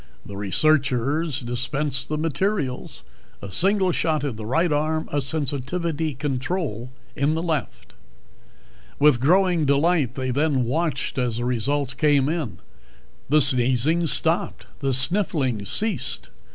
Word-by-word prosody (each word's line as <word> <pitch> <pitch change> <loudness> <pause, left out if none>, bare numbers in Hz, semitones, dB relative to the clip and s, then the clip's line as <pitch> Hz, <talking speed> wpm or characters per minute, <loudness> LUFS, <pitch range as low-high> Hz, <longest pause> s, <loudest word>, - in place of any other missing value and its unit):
The 100 - -9
researchers 140 - +1
dispensed 130 +3 -2
the 155 - -1
materials 160 -2 -2 0.4
a 100 - -9
single 190 - +2
shot 155 -3 0
in 140 -6 -3
the 110 0 -7
right 165 +6 +1
arm, 155 +2 -1
a 145 - 0
sensitivity 150 +2 -2
control 130 - -3 0.2
in 145 +3 +1
the 165 - -2
left. 160 -4 -4 1.0
With 145 -4 +4
growing 175 +4 +3
delight 140 -2 +2
they 130 -1 -2
then 140 -1 +1
watched 145 +1 -2
as 120 -3 -1
the 120 - -3
results 130 +3 -1
came 140 0 +2
in. 150 - -3 0.7
The 150 +1 +4
sneezing 130 +5 +4
stopped; - - 0
the 135 - -1
sniffling 130 - +1
ceased. 200 - -1
145 Hz, 125 wpm, -23 LUFS, 125-160 Hz, 1.0 s, With